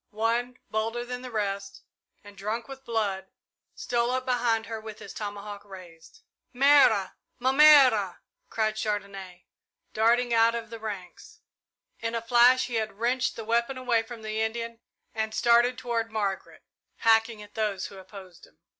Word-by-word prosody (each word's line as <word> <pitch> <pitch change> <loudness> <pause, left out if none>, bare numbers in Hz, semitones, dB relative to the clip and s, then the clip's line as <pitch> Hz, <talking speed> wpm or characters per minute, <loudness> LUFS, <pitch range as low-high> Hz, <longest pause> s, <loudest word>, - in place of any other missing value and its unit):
One, 235 +3 -1
bolder 225 +2 -2
than 250 0 -6
the 255 - -8
rest, 200 -3 -4 0.4
and 205 -1 -14
drunk 215 +4 -4
with 270 0 -10
blood, 200 -5 -2 0.5
stole 240 0 -1
up 255 0 -1
behind 240 -3 +1
her 225 -1 -6
with 215 -1 -9
his 200 - -10
tomahawk 205 -1 -6
upraised. 185 - -14 0.3
"Mère! 265 -7 +5 0.3
Ma 255 +1 +1
mère!" 270 - +6 0.3
cried 215 -1 -1
Chandonnais, 195 -4 -5 0.5
darting 235 +2 +2
out 230 0 +4
of 230 -1 -6
the 230 - -7
ranks. 200 -5 -8 0.6
In 230 0 -3
a 230 - -1
flash 245 +2 +5
he 240 -3 -3
had 220 -1 -2
wrenched 250 +3 0
the 225 - -7
weapon 235 +4 0
away 245 -3 +1
from 225 0 -10
the 215 0 -3
Indian 230 +1 -3 0.3
and 220 0 -3
started 240 +1 +3
toward 230 -2 -2
Margaret, 200 -3 -4 0.3
hacking 225 -1 +2
at 205 - -16
those 210 -4 -2
who 195 - -9
opposed 190 -2 -13
him. 80 - -28
225 Hz, 155 wpm, -27 LUFS, 205-240 Hz, 0.6 s, mère